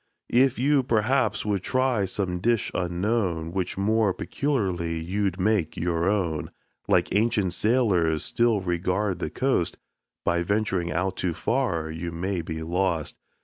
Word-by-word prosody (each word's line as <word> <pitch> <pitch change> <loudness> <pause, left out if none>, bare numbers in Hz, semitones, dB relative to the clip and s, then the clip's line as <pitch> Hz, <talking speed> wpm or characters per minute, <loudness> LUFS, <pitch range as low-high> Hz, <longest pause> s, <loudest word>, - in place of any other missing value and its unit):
If 130 +1 +3
you, 140 +2 +3
perhaps, 125 +2 +1
would 100 -3 0
try 130 -3 +1
some 95 -1 -2
dish 115 +3 +1
unknown, 90 -2 -1
Which 95 0 -2
more 105 0 +2
peculiarly 95 - -1
you'd 95 +2 -1
make 100 -4 +1
your 85 +1 0
own, 90 -7 -1 0.4
Like - - +2
ancient 105 -4 +2
sailors, 95 -9 +2
still 115 -4 +2
regard 90 +2 -1
the 85 - -2
coast, 125 - 0 0.5
By 85 0 +2
venturing 95 -2 0
out 95 +4 -1
too 85 -3 -1
far 90 -12 -1
you 85 +2 -5
may 90 +2 -2
be 80 0 -5
lost. 85 -2 -1
95 Hz, 140 wpm, -26 LUFS, 85-110 Hz, 0.5 s, If